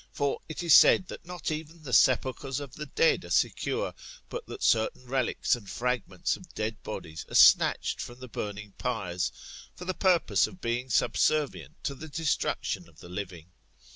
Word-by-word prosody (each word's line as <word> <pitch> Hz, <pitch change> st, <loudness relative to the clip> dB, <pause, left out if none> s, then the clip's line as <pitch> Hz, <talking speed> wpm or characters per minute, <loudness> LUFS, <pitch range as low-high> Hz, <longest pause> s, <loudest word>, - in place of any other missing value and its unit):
For 140 Hz, -1 st, -1 dB
it 155 Hz, -, -5 dB
is 170 Hz, -3 st, +5 dB
said, 185 Hz, -, +7 dB
that -, -, -9 dB
not 175 Hz, -3 st, -4 dB
even 155 Hz, +1 st, -6 dB
the 130 Hz, -4 st, -6 dB
sepulchres 130 Hz, +2 st, +3 dB
of 140 Hz, -3 st, -8 dB
me 150 Hz, 0 st, -6 dB
dead 475 Hz, +1 st, +3 dB
are -, -, -10 dB
secure, -, -, 0 dB, 0.4 s
but 485 Hz, -, -5 dB
that 420 Hz, -, -7 dB
certain 115 Hz, +3 st, +2 dB
relics 130 Hz, -1 st, +1 dB
and 105 Hz, -5 st, -11 dB
fragments 120 Hz, -7 st, -1 dB
of 175 Hz, -3 st, -14 dB
dead 110 Hz, 0 st, -3 dB
bodies 80 Hz, -7 st, -6 dB
are -, -, -6 dB
snatched -, -, +5 dB
from 120 Hz, +1 st, -8 dB
the 130 Hz, -, -8 dB
burning 105 Hz, -2 st, -6 dB
pyres, 95 Hz, -8 st, -2 dB, 0.4 s
for 180 Hz, -, -9 dB
the 185 Hz, -, -1 dB
purpose 185 Hz, -3 st, +3 dB
of 185 Hz, -, -13 dB
being 120 Hz, 0 st, -2 dB
subservient 150 Hz, +3 st, 0 dB
to 140 Hz, -, -2 dB
the 155 Hz, +4 st, -9 dB
destruction 145 Hz, -, -2 dB
of 80 Hz, -1 st, -21 dB
the 85 Hz, -, -12 dB
living. 90 Hz, -3 st, -7 dB
130 Hz, 175 wpm, -28 LUFS, 105-155 Hz, 0.4 s, said